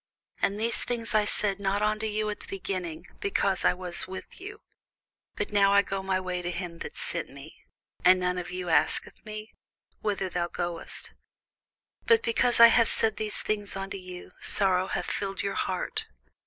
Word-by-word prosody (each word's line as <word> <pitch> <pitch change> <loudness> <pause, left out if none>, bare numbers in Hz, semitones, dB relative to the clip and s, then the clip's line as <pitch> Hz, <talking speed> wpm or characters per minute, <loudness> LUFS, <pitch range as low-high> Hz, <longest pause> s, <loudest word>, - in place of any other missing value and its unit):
And 200 +1 +1
these 230 +2 0
things 235 -1 0
I 215 -1 +4
said 205 -1 0
not 200 +1 0
unto 215 +1 +1
you 215 0 -1
at 210 - -6
the - - -12
beginning, 185 -4 -4
because 360 - +1
I - - +4
was 180 0 -5
with 190 - -8
you. 410 +3 -8 0.7
But - - -2
now 200 -1 +5
I 200 0 +6
go 195 -1 -3
my 190 -1 0
way 180 -1 -3
to 175 - -3
him 175 -1 -5
that - - -7
sent 170 -2 -2
me; 140 +3 -12 0.4
and 185 0 +7
none 180 0 0
of 175 - -6
you 180 0 -4
asketh 165 - +1
me, 215 0 -7 0.5
Whither 200 -2 -1 0.2
goest 175 -1 -4
thou? - - -27 0.9
But 460 -1 +5
because 240 +1 +2
I 235 0 +11
have 230 -1 +4
said 220 - +2
these 215 -1 +1
things 205 -2 -1
unto 195 0 -4
you, 185 -1 -9
sorrow 190 -2 +2
hath - - -2
filled 195 -1 -2
your 200 0 -1
heart. 185 -2 -2
195 Hz, 180 wpm, -28 LUFS, 180-215 Hz, 0.9 s, I